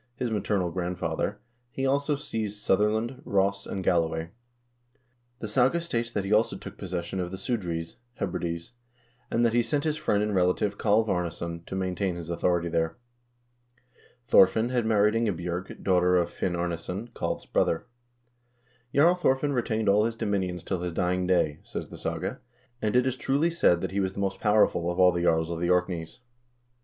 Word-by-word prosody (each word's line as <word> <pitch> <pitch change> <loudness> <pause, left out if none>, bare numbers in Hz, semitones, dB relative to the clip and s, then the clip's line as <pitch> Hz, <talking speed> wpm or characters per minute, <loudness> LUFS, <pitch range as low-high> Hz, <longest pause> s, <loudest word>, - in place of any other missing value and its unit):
his 120 -1 -2
maternal 100 -4 0
grandfather, 90 +2 -2 0.3
he 135 +2 -3
also 140 +2 +1
seized 110 -7 -4
Sutherland, 110 +6 +1
Ross, 100 -2 0
and 95 - -4
Galloway. 80 -1 +1 1.1
The 110 - -5
saga 130 +9 +3
states 120 -9 -2
that 100 -4 -2
he 100 - 0
also 105 -2 +2
took - - -9
possession 90 -1 -4
of 90 -1 -2
the 95 - -6
Sudr 105 -6 -2
eys 85 0 -5 0.2
(Hebrides), 85 +1 -3 0.6
and 120 +1 +2
that 115 - +2
he 120 - +4
sent 145 +4 -1
his 155 -1 0
friend 105 -7 +1
and 105 0 -1
relative 95 +2 +1
Kalv 110 +1 +3
Arnes 90 -4 -1
son 85 0 -5
to - - -5
maintain 95 -1 -1
his 85 -1 -6
authority 85 0 +1
there. 80 +2 -1 1.3
Thorfinn 110 +3 +5
had 120 -3 0
married 105 -1 +4
Inge 115 -6 0
bj0rg, 90 +2 -5
daughter 90 -1 +3
of 85 -1 +1
Finn 90 - -2
Arnesson, 90 +5 -3
Kalv's - - -3
brother. 80 - +1 1.1
"Jarl 160 +5 +6
Thorfinn 145 -5 +1
retained 110 -4 0
all 105 +2 +4
his 115 0 -2
dominions 95 -5 -2
till 90 -1 -2
his 90 -1 -3
dying 90 +1 0
day," 85 -5 +2
says - - -6
the - - -9
saga, - - -3 0.4
"and 110 +1 0
it 125 0 +4
is 130 -1 0
truly 140 +6 +1
said 90 - +3
that - - -3
he 100 - -1
was 95 -1 0
the - - -7
most 95 -1 -1
powerful 105 -5 +3
of 85 - -5
all 90 0 +7
the 85 0 -2
jarls 80 -1 +2
of 85 - -3
the 85 +1 0
Orkneys." 90 +2 0
95 Hz, 180 wpm, -27 LUFS, 85-115 Hz, 1.3 s, all